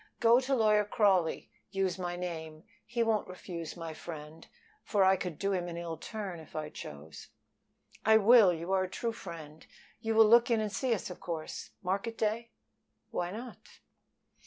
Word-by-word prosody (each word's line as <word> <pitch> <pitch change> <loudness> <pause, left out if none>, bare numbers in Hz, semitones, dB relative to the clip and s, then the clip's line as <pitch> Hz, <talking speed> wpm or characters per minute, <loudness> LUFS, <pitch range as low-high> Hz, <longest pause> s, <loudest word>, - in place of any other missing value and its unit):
Go 235 +1 +6
to 265 +1 0
Lawyer 215 -3 +4
Crawley. 195 -5 +2 0.2
Use 190 -1 -1
my 175 -1 -3
name. 160 -3 -6 0.2
He 235 +1 0
won't 220 -2 +1
refuse 175 -2 -7
my 165 -1 -5
friend, 155 0 -9 0.4
for 205 -3 +2
I 190 0 +6
could 180 -4 -5
do 200 0 0
him 180 -2 -1
an 170 -1 -5
ill 170 -1 -4
turn 200 -3 -6
if 160 - -14
I 155 -1 -3
chose." 75 - -9 0.8
"I 220 0 +6
will. 220 -2 +7
You 170 +2 -4
are 190 -1 +3
a - - -8
true 230 +4 -2
friend. 160 -7 -9 0.4
You 225 -1 -1
will 225 0 +8
look 235 +3 +6
in 230 -2 +3
and 215 -1 -1
see 235 +4 +1
us, 190 - -6
of - - -9
course, 165 -3 -5
market 200 +5 -2
day?" 225 +2 -1 0.6
"Why 175 - -1
not?" 235 +6 -7
190 Hz, 180 wpm, -31 LUFS, 170-220 Hz, 0.8 s, will